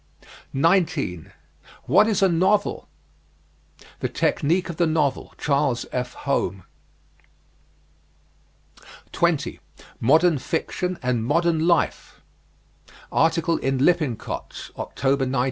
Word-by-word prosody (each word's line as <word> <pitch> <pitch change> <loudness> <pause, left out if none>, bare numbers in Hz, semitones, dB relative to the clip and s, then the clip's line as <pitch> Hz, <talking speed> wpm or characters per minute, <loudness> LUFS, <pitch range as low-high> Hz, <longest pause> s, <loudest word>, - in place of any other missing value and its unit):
19. 155 - 0 0.5
WHAT 215 - +4
IS 215 -2 +1
A - - +6
NOVEL? 190 +4 +1 1.1
"The - - -2
Technique 170 +5 0
of 170 -3 -6
the 170 - +2
Novel," 155 -3 -1
Charles 140 -4 0
F. 125 -1 -3
Home. 100 -9 -1 2.5
20. - - 0 0.4
MODERN 155 +5 +4
FICTION 180 +5 -3
AND 125 -2 0
MODERN 165 +4 +1
LIFE. 170 -2 0 0.9
Article 165 0 +2
in 135 0 -1
Lippincott's, 150 -10 -2
October, 135 0 -1
1907. 130 - -2
160 Hz, 95 wpm, -23 LUFS, 135-175 Hz, 2.5 s, A